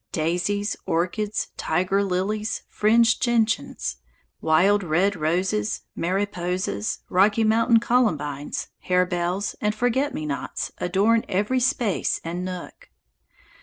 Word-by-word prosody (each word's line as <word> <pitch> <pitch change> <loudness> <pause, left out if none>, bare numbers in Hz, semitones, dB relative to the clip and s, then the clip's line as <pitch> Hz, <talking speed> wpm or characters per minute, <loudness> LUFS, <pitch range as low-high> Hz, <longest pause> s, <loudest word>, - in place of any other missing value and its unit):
Daisies, 180 +6 -1
orchids, 200 +5 -1
tiger 185 +4 +1
lilies, 200 +3 -2
fringed 225 +2 +3
gentians, 225 - 0 0.4
wild 190 +6 +4
red 185 +4 +1
roses, 160 - 0
mariposas, 180 - -2
Rocky 205 +4 +3
Mountain 230 +1 +4
columbines, 150 - 0 0.2
harebells, 180 +1 0
and 210 0 0
forget 245 +5 +1
me 155 - -4
nots 140 -2 -4
adorn 205 +6 +2
every 205 +7 +1
space 240 -5 0
and 175 +2 -4
nook. 180 -1 -7
195 Hz, 100 wpm, -24 LUFS, 175-215 Hz, 0.4 s, wild